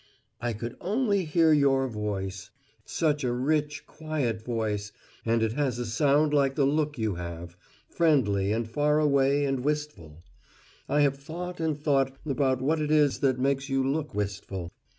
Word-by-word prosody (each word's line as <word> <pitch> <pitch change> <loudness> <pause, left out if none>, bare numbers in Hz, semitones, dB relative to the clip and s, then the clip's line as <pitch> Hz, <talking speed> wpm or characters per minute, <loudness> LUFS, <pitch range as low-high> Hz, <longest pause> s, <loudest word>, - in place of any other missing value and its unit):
I 120 -1 -2
could 115 +3 -6
only 200 -1 +1
hear 160 0 +4
Your 135 -2 +3
voice 95 -4 -4 0.4
such 150 -3 0
a 125 - 0
rich, 150 +3 -1
quiet 145 -9 -3
voice, 110 -3 -2 0.4
and 115 0 +2
it 110 - +1
has 135 -3 -1
a 120 - -3
sound 145 +6 +2
like 135 -2 +2
the 140 - +3
look 150 +1 0
you 110 -3 -1
have 85 0 -7 0.3
friendly 105 - +2
and 115 +1 -1
faraway 145 +1 +2
and 135 -1 0
wistful. 145 - -4 0.7
I 145 - +3
have 140 -1 +2
thought 175 +5 -7
and 160 -3 -1
thought 135 -3 +1
about 135 -3 0
what 155 +3 +1
it 150 - -1
is 150 -2 +3
that 130 -3 +2
makes 135 +2 0
you 135 0 +1
look 150 -3 -2
wistful. 95 -3 -4
135 Hz, 160 wpm, -27 LUFS, 115-150 Hz, 0.7 s, hear